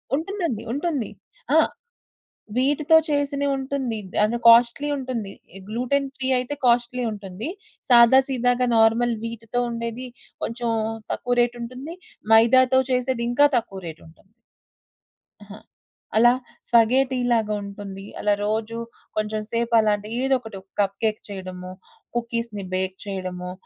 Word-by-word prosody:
ఉంటుందండి. 330 - -3
ఉంటుంది. 285 - -2 0.5
ఆ! - - +7 1.0
వీటితో 295 +4 +4
చేసినయుంటుంది. 280 -4 -1 0.3
అండ్ 220 +3 +1
కాస్ట్‌లీ 235 +5 +6
ఉంటుంది. 245 -7 -4 0.4
గ్లూటెన్ 255 +5 0
ఫ్రీ 260 - -2
అయితే 255 +4 -3
కాస్ట్‌లీ 245 +1 +2
ఉంటుంది. 200 - -6 0.4
సాదా 240 +1 +8
సీదాగా 250 -1 +1
నార్మల్ 225 +2 +4
వీట్‌తో 230 +1 -3
ఉండేది 235 +2 -5 0.4
కొంచెం 235 0 -2 0.4
తక్కువ 245 0 -1
రేటుంటుంది. 245 +6 -4 0.4
మైదాతో 255 +3 +6
చేసేది 250 -1 0
ఇంకా 290 +4 +5
తక్కువ 195 -4 -4
రేటుంటుంది. 165 +5 -13 1.1
అహ! 200 - -12 0.6
అలా 240 +2 +7 0.4
స్వగేటీలాగుంటుంది. 220 -5 +1
అలా 205 0 +2
రోజు 220 +2 -2 0.4
కొంచెం 215 0 -1
సేపలాంటి 220 -3 +2
ఏదొకటి 250 -6 -1 0.2
కప్ 195 -1 +1
కేేక్ 215 -1 +1
చేయడమొ, 185 -2 -7 0.4
కుకీస్‌ని 230 -3 -3
బేక్ 185 0 -1
చేయడమొ, 185 -2 -5
235 Hz, 100 wpm, -23 LUFS, 215-260 Hz, 1.1 s, సాదా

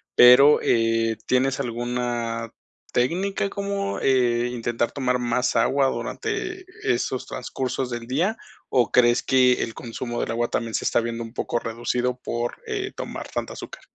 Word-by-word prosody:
pero, 125 +4 +8
eh, 115 -1 +2
¿tienes 130 +1 +1
alguna 120 -2 -2 0.4
técnica 190 +10 0
como, 200 0 -3
eh, 125 -2 +2
intentar 120 -1 -1
tomar 125 -3 0
más 125 0 0
agua 135 +4 +3
durante 405 - -3 0.2
esos 430 - 0
transcursos 130 0 -3
del 120 -1 -5
día, 170 - 0 0.3
o 125 -3 +2
crees 120 -1 +4
que 130 -1 +4
el 115 - -5
consumo 120 +1 -5
del - - -3
agua 120 +1 0
también 115 -2 -2
se - - -1
está - - +3
viendo 115 0 -3
un 115 0 -10
poco 120 - -2
reducido 120 +2 -2
por, 120 0 -3
eh, 405 -3 -3
tomar - - -6
tanta - - -4
azúcar? - - -9
125 Hz, 150 wpm, -24 LUFS, 120-135 Hz, 0.4 s, pero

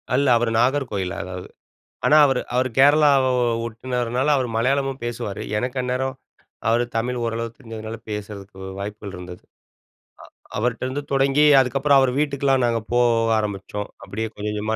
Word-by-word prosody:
இல்ல, 140 +1 +2
அவரு 115 -1 0
நாகர்கோயில் 120 -8 0
அதாவது 90 0 -7 0.6
ஆனா, 150 - +6
அவரு 135 -2 +1
அவரு 130 +1 +2
கேரளாவ 145 -1 +6 0.4
ஒட்டுனவர்னால 125 +3 -2
அவர் 130 -3 -1
மலையாளமும் 135 +3 0
பேசுவாரு. 110 -4 -4 0.2
எனக்கு 125 +3 -3
அந்நேரம் 130 +1 -2 0.5
அவர் 120 +2 +3
தமிழ் 125 +2 -1
ஓரளவுக்கு 115 0 -4
தெரிஞ்சதுனால 115 -2 -7
பேசுறதுக்கு 100 -2 -7 0.2
வாய்ப்புகள் 100 -1 -6
இருந்தது. 90 0 -10 0.9
அ - - -21
அவர்ட்டேருந்து 130 +5 -2
தொடங்கி 135 +2 +3 0.2
அதுக்கப்புறம் 135 +2 +3
அவர் 130 -2 +2
வீட்டுக்குலாம் 140 -3 +1
நாங்க 115 -1 0
போக 115 -2 +3
ஆரம்பிச்சோம் 105 0 -4 0.2
அப்டியே 110 +3 -3
கொஞ்சம் 105 +1 -4
கொஞ்சமா 105 +1 -2
120 Hz, 135 wpm, -22 LUFS, 110-135 Hz, 0.9 s, ஆனா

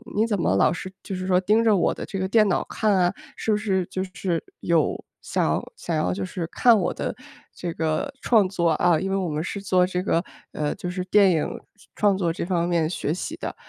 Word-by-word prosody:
你 220 +2 +2
怎 205 -4 -1
么 95 - +2
老 - - +4
是 185 +1 -6
就 195 - -5
是 185 0 -4
说 180 -1 +3
盯 215 +4 +3
着 220 -3 +4
我 175 - +2
的 - - -6
这 195 - -5
个 190 - 0
电 215 +1 +4
脑 185 - +1
看 215 -2 +1
啊， 180 -1 +3 0.2
是 - - -5
不 210 - +3
是 195 -4 0
就 185 - -3
是 170 -4 -1 0.2
有 165 -3 +1 0.2
想 - - 0 0.2
想 - - -3
要 90 0 0
就 95 +1 -3
是 165 - -4
看 235 -3 +5
我 175 - -1
的 - - -3 0.4
这 170 -2 -4
个 160 - -1
创 215 -6 +4
作？ 170 -3 0
啊， 170 0 +3
因 190 - -2
为 195 - 0
我 185 -2 -1
们 155 +1 -2
是 200 - -4
做 185 -2 +2
这 180 0 -2
个， 170 -2 +1 0.3
呃， 150 -1 -2
就 180 - -5
是 180 0 -3
电 195 0 +5
影 160 -3 +1 0.5
创 205 -2 +3
作 175 -3 0
这 170 - -4
方 175 -1 0
面 165 -2 +2
学 155 -3 -2
习 300 - -4
的， - - -5
185 Hz, 255 characters per minute, -24 LUFS, 170-200 Hz, 0.5 s, 看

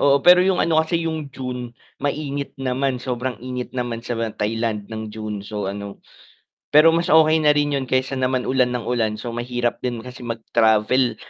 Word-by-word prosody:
oo 140 0 +5
pero 180 0 +8
'yong 185 0 +3
ano 160 -1 +3
kasi 165 +1 -1
'yong 160 -3 -3
June 125 -2 -6 0.2
mainit 145 0 -3
naman 135 0 -1
sobrang 125 0 -3
init 125 -1 -4
naman 120 -2 -2
sa 120 0 -4 0.2
Thailand 110 -1 -2
ng 110 -1 -6
June 105 -2 -5
so 105 -2 -4
ano, 100 0 -7 0.7
pero 155 +2 +8
mas 170 +1 +1
okay 160 0 +5
na 150 -1 +4
rin 145 -1 +1
'yon 130 - -4
kaysa 130 +1 0
naman 130 0 +1
ulan 125 -1 +1
ng 120 -3 -3
ulan 115 -3 0
so 120 +2 -6
mahirap 120 0 -2
din 120 -3 -4
kasi 125 -1 -9
mag-travel 115 +1 +2
125 Hz, 180 wpm, -22 LUFS, 115-140 Hz, 0.7 s, pero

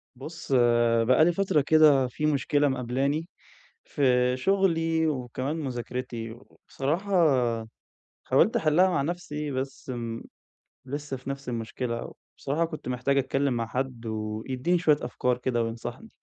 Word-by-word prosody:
بُص، 155 +3 -9 0.5
بقى 130 +6 +5
لي 175 - +4
فترة 190 -4 +1
كده 145 -3 +5
في 150 +4 -4
مشكلة 145 0 +2
مقابلاني، 135 +5 -1 0.6
في 125 - +2
شغلي، 165 -1 +2
وكمان 130 0 -3
مذاكرتي، 125 -5 -4
وبصراحة 145 - -5 1.1
حاولت - - +3
أحلها 165 +4 +4
مع 175 -6 +1
نفسي 150 -2 -4
بس 135 0 -5
م 115 -2 -4 0.6
لسه 145 0 -5
في 125 +2 -8
نفس 140 -1 -5
المشكلة. 115 0 -4 0.3
وبصراحة 155 +5 0
كنت 155 -5 -8
محتاج 125 +2 0
أتكلم 135 0 +1
مع 115 -1 -2
حد، 125 0 -4
ويدّيني 110 +9 -2
شوية 155 -4 +4
أفكار 125 -1 -1
كده، 125 -1 0
وينصحني. 115 - -6
135 Hz, 125 wpm, -27 LUFS, 125-155 Hz, 1.1 s, بقى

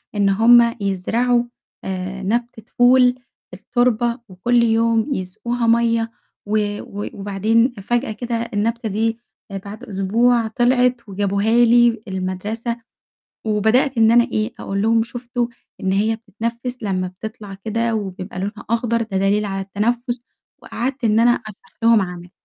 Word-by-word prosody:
إن 200 -1 +3
هُم 235 +3 +5
يزرعوا 230 +6 +1 0.4
آآ 190 +1 -4
نبتة 230 +2 -2
فول 250 0 +6 0.4
في 180 - -10
التربة 240 0 +1
وكُل 235 +6 +2
يوم 230 +3 +2
يسقوها 235 +5 -3
مَيَّة، 230 0 +2 0.3
و 205 0 -1
و 205 +1 -6
وبعدين 215 +5 +1
فجأة 240 +5 -1
كده 235 +2 -4 0.2
النبتة 225 +2 -1
دي 225 +3 -1 0.5
بعد 205 +2 -9
أسبوع 225 +4 +1
طلعت 245 0 +1
وجابوها 200 +2 0
لي 235 -1 +4
المدرسة، 205 +5 -3 0.6
وبدأت 220 +5 +2
إن 225 0 +5
أنا 240 +1 +6
إيه، 215 0 -2
أقول 195 0 -2
لهم 225 +1 +3
شُفتوا 240 +1 -3 0.3
إن 190 - 0
هي 215 +3 +1
بتتنفّس 230 +3 -5
لمّا 185 -3 -1
بتطلع 205 +2 -8
كده 225 +3 -2
وبيبقى 190 -3 -5
لونها 205 +2 -5
أخضر 230 0 +1
ده 220 -4 -2
دليل 200 +2 +2
على 195 -1 -3
التنفّس، 235 +5 -2 0.4
وقعدت 255 +3 -4
إن 220 -1 +3
أنا 240 +1 +5
أشرح 215 -5 -6
لهم 230 -2 +6
عملي. 180 -1 -6
225 Hz, 135 wpm, -20 LUFS, 200-235 Hz, 0.6 s, فول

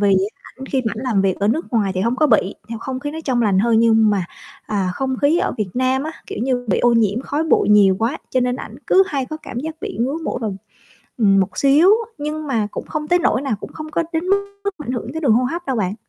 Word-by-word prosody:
vì 200 -2 +4 0.3
ảnh 265 +1 -11
khi 265 -2 -1
mà - - 0
ảnh 230 - -5
làm 225 -7 +1
việc 190 -2 +1
ở 200 - +2
nước 315 +9 0
ngoài 205 -4 +1
thì 185 - -1
hông 235 +5 0
có 305 - +3
bị, 215 -6 +2
nhiều 230 -1 -5
không 260 +2 -5
khí 290 +1 -4
nó 315 - -6
trong 250 -3 +1
lành 200 -4 +2
hơn. 225 +2 +3
Nhưng 225 -2 +4
mà, 200 -3 0 0.4
à, 195 -3 -1
không 265 +2 -2
khí 310 +5 +4
ở - - 0
Việt 210 -3 -1
Nam 260 +1 +1
á, 315 +2 -4
kiểu - - -6
như, 250 -1 0
bị 190 - +2
ô 240 - +3
nhiễm 225 0 +2
khói 290 +3 -2
bụi 315 - +2
nhiều 200 -2 +5
quá 230 +3 -1
cho 255 - +1
nên 250 0 0
ảnh - - -8
cứ 380 - +6
hay 275 -8 -2
có 310 - -5
cảm 240 - -6
giác 315 +3 -5
bị - - -5
ngứa 270 +6 0
mũi - - -2
vào, 210 -4 -3 0.6
ừm, 200 -4 +4
một 195 +1 -1
xíu, 285 +6 +5 0.3
nhưng 300 +1 -4
mà 225 -6 0
cũng - - -6
không 300 -1 -4
tới 355 0 +3
nỗi 275 - +1
nào, 270 -6 -1
cũng - - -9
không 310 -1 -8
có 335 - 0
đến 320 +1 0
mức 400 +1 +3 0.4
mà 300 - -7
ảnh 250 - -1
hưởng 245 0 -4
tới 320 - -4
đường 275 -7 +3
hô 245 +3 +3
hấp 340 +7 -3
đâu 265 -2 -1
bạn. 205 +1 -3
250 Hz, 280 wpm, -20 LUFS, 215-290 Hz, 0.6 s, cứ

